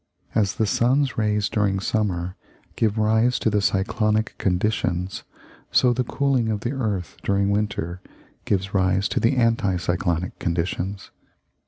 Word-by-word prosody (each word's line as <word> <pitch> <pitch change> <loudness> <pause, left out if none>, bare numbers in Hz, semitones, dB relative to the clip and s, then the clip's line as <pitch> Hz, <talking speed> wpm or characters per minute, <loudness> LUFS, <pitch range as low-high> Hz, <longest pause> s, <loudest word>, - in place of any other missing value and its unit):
As 100 -3 +1
the 110 - +1
sun's 130 +6 +2
rays 105 -1 +1
during 100 -2 0
summer 95 -4 -1 0.4
give 110 -1 +1
rise 110 +3 +3
to 110 - 0
the 105 -1 +2
cyclonic 105 +3 +1
conditions, 90 -1 -1 0.5
so 125 -1 +4
the 125 +1 0
cooling 130 -2 0
of 105 -2 -1
the 120 - -2
earth 105 -10 -3
during 100 0 +1
winter 100 -4 -2 0.4
gives 95 0 -1
rise 95 +1 +2
to - - -1
anti 115 -7 +2
cyclonic 85 0 -1
conditions. 90 +3 -2
105 Hz, 135 wpm, -23 LUFS, 95-110 Hz, 0.5 s, so